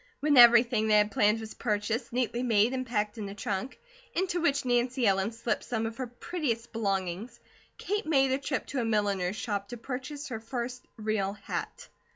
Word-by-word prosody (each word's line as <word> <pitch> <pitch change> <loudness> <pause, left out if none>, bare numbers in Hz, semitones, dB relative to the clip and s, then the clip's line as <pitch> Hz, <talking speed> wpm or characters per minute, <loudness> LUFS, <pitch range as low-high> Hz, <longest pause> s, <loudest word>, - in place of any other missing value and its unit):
When 290 0 +2
everything 235 -2 +7
they 215 -1 +5
had 210 0 +3
planned 210 +2 +3
was 220 0 -7
purchased, 220 +2 -2
neatly 240 0 -1
made, 230 -1 +3
and 255 -1 -3
packed 210 -2 -1
in 205 -2 -4
a 200 - -8
trunk, 205 +5 -3 0.4
into 355 -1 0
which 285 -5 +1
Nancy 245 +1 +1
Ellen 195 +1 +2
slipped 235 +1 -2
some 225 -3 -2
of 225 0 -5
her 260 -1 -3
prettiest 240 -2 -3
belongings, 200 +1 -2 0.4
Kate 415 0 -2
made 270 -4 +3
a 265 - +1
trip 275 -1 -2
to 275 - -2
a - - 0
milliner's 205 -4 0
shop 200 -2 -3
to 240 - -7
purchase 265 +4 -6
her 225 -3 -4
first 245 +2 -5
real 215 -3 -1
hat. - - -6
235 Hz, 190 wpm, -29 LUFS, 210-255 Hz, 0.4 s, everything